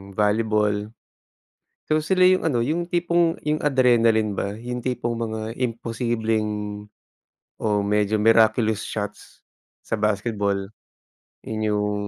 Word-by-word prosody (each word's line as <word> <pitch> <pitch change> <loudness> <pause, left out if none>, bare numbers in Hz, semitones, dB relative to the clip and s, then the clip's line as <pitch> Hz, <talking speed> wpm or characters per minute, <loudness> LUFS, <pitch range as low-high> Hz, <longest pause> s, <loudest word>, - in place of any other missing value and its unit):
volleyball. 105 -1 +1 1.0
So 155 0 +1
sila 185 +3 +3
yung 185 0 +4
ano 120 -4 0
yung 170 +4 -2
tipong 170 -1 +1
yung 150 0 0
adrenaline 115 -6 +3
ba, 100 +2 -3
yung 125 +1 -5
tipong 120 -2 -2
mga 110 0 -4
imposibleng 110 -3 -2 0.7
o 105 -2 +1
medyo 105 +1 +1
miraculous 110 0 +3
shots 105 -1 -6 0.5
sa - - -2
basketball. 105 -2 -1 0.8
Yun 110 0 -5
yung 105 0 0
110 Hz, 110 wpm, -23 LUFS, 105-125 Hz, 1.0 s, yung